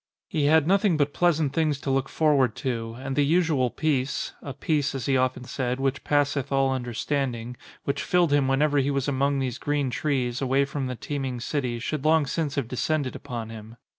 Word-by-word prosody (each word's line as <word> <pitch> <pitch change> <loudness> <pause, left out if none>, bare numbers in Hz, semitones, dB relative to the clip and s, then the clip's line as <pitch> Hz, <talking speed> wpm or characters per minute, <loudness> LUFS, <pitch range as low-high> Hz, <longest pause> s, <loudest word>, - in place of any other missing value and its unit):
He 155 -8 0
had 155 0 +5
nothing 190 -1 +3
but 145 -1 +1
pleasant 160 -5 +2
things 155 -3 +1
to 135 - -2
look 135 0 0
for 155 -1 +2
ward 130 -5 +2
to 115 -3 -3
and 135 0 -4
the 145 - +3
usual 155 -4 +2
peace 140 -1 -1
(a 140 - -6
peace, 145 0 -1
as 135 - -3
he 135 - +2
often 130 -1 +1
said, 125 0 -2
which 135 0 -1
passeth 145 -2 +1
all 135 -1 +2
understanding), 125 -1 -2 0.3
which 140 - -1
filled 175 -4 +2
him 145 -2 +3
whenever 145 +2 +2
he 135 +1 +1
was 140 -1 0
among 140 0 +1
these 130 -2 -2
green 145 -3 0
trees, 125 -2 -1
away 135 +1 +2
from 140 -1 -3
the 125 - -4
teeming 135 -1 -4
city, 125 -2 -2
should 135 +4 -3
long 155 -1 +4
since 145 +1 -2
have 140 -5 -1
de 125 - -6
scended 150 -3 0
upon 120 -5 -6
him. 110 +1 -10
140 Hz, 205 wpm, -26 LUFS, 130-145 Hz, 0.3 s, had